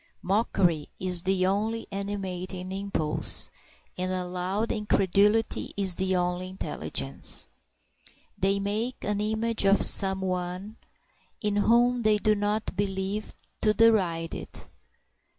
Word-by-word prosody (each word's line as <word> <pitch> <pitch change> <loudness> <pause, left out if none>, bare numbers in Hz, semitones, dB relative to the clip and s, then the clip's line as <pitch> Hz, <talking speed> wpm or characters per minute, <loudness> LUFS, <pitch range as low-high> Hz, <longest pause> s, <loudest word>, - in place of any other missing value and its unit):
Mockery 185 -5 +1
is 180 -2 +2
the 185 0 +1
only 215 +4 -1
animating 190 -2 -4
impulse, 195 -6 0 0.5
and 185 0 -1
a 185 -1 -2
loud 185 +5 -2
incredulity 210 +1 +1
is 195 -2 +2
the 190 +1 0
only 180 0 -1
intelligence. 70 - -3 0.9
They 195 +1 +1
make 215 +5 -2
an 205 0 0
image 220 +1 -1
of 200 0 +4
some 190 -1 +5
one 185 +3 -4 0.6
in 210 -1 0
whom 240 +3 +3
they 215 -1 +4
do 215 0 +2
not 210 0 -1
believe, 195 +1 -3 0.3
to 215 0 +3
deride 180 -8 +3
it. - - -7
195 Hz, 115 wpm, -27 LUFS, 185-210 Hz, 0.9 s, some